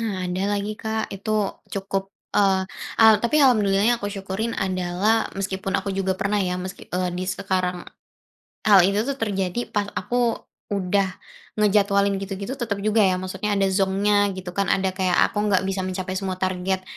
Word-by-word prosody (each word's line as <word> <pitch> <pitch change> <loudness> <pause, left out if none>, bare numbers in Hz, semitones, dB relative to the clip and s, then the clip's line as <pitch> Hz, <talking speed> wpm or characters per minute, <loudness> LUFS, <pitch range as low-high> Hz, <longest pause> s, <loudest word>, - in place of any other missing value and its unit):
nah, 220 -3 -2
ada 180 +1 -2
lagi, 205 +1 -2
Kak. 220 0 -3
Itu 205 0 -2
cukup, 195 0 -3 0.2
eee, 190 -2 +3 0.4
al 220 -1 +9
tapi 240 +6 +1
alhamdulillah-nya 220 -2 +3
aku 205 - -2
syukurin 200 +3 -3
adalah, 190 +3 0
meskipun 195 0 -2
aku 195 +1 -2
juga 190 -1 -1
pernah 205 +2 0
ya, 180 -1 -1
meski, 185 +1 -7
eee, 180 0 -1
di 180 +1 -3
sekarang. 185 -2 -1 0.8
Hal 200 -3 +8
itu 200 +2 +1
tuh 280 -1 -2
terjadi, 200 0 -1
pas 205 -1 0
aku 240 +3 0 0.3
udah 200 -1 +1 0.5
ngejadwalin 200 -1 +3
gitu-gitu, 195 +3 -5
tetap 210 -6 -3
juga 215 +2 +1
ya 190 -3 +4
maksudnya 190 +3 -2
ada 195 -1 +2
zonk-nya, 200 +1 +2
gitu 185 -1 -6
kan. 200 +2 0
Ada 190 0 +2
kayak 185 -1 0
aku 210 - -4
enggak 195 -3 +3
bisa 190 0 -2
mencapai 185 0 -4
semua 190 -1 -3
target 185 0 -1
195 Hz, 165 wpm, -23 LUFS, 190-210 Hz, 0.8 s, al